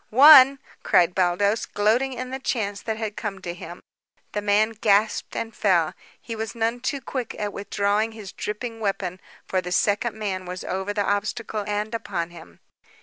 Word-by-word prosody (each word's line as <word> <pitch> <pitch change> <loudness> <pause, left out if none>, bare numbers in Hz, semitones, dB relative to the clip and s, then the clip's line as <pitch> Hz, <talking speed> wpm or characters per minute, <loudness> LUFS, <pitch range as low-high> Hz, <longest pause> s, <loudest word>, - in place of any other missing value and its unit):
"One!" 275 +2 +9 0.2
cried 175 0 +3
Baldos, 190 +4 +1
gloating 230 +6 +1
in 255 0 -6
the 265 - -4
chance 205 -6 -2
that 220 -1 -3
had 220 -2 -4
come 200 -3 -4
to 175 - -4
him. 175 0 -10 0.5
The 210 - -2
man 210 +2 +3
gasped 215 -1 +1
and 225 -1 -4
fell. 175 -6 +2 0.3
He 230 - -7
was 220 +1 -5
none 230 +1 0
too 270 +3 -2
quick 255 -3 -5
in 210 -1 -3
withdrawing 205 +2 -1
his 210 -4 -9
dripping 225 +2 -5
weapon, 195 -3 -2 0.2
for 185 - 0
the 180 0 -6
second 205 +5 +1
man 190 -4 -3
was 180 0 -6
over 190 +2 -3
the 205 -1 -1
obstacle 210 +1 -2
and 210 +2 -2
upon 180 -7 -3
him. 85 - -14
210 Hz, 175 wpm, -24 LUFS, 195-225 Hz, 0.5 s, One